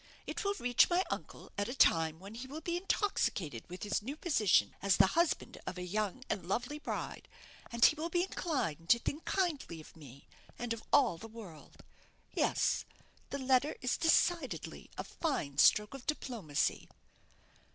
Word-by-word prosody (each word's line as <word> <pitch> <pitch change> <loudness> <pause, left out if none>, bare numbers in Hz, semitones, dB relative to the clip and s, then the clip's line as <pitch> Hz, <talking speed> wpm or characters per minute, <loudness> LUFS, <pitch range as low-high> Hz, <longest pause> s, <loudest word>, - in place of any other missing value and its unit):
It - - -4
will 400 0 0
reach 245 - +4
my 355 +1 +3
uncle - - -6
at 205 - -1
a 250 - -4
time 160 -9 +4
when 195 +3 -10
he 245 +3 -7
will 290 +4 -6
be 340 +2 -2
intoxicated 200 - -1
with 180 +1 -7
his 205 0 0
new 265 +7 -5
position 210 - +3
as 200 -1 +3
the - - +7
husband 340 0 +1
of 185 - -4
a 180 - -4
young 210 +5 -2
and 190 - -2
lovely 245 +9 -2
bride; - - -5 0.4
and 235 -1 +5
he - - +7
will 320 +2 -4
be 350 +1 +2
inclined 260 - -2
to 235 - +7
think 285 +6 -4
kindly 320 - -1
of 155 - -13
me, 140 -4 -13 0.3
and 240 -1 -2
of 230 - -7
all 245 -13 +4
the 225 - -8
world. 215 -9 -12 0.5
Yes - - +1 0.5
the 280 - -3
letter 265 +2 +2
is 250 -2 0
decidedly 330 -3 +1
a - - -2
fine 200 - -3
stroke 210 +6 +5
of 270 -2 -9
diplomacy." 230 - -1
240 Hz, 170 wpm, -33 LUFS, 180-300 Hz, 0.5 s, the